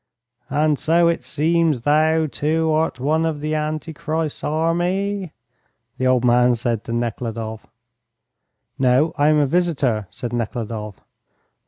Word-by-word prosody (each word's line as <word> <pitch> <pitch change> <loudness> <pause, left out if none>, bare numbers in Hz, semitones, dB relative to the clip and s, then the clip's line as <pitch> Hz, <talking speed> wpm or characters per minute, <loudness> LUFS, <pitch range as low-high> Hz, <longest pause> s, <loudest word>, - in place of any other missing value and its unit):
"And 150 0 +1
so 170 +2 +3
it 170 - -1
seems 160 -4 +1
thou, 155 +2 +3
too, 160 +2 0
art 155 -4 0
one 155 +5 +1
of 155 -2 -2
Antichrist's 155 0 -3
army?" 175 +4 -1 0.7
the 130 - +1
old 125 -1 +3
man 120 0 +4
said 115 -2 -2
to - - -6
Nekhludoff. 115 -1 -4 1.1
"No, 130 +4 +3
I 145 - +2
am 155 0 +4
a 145 - +3
visitor," 140 - 0
said 120 -2 -6
Nekhludoff. 110 -3 -4
150 Hz, 125 wpm, -21 LUFS, 120-160 Hz, 1.1 s, man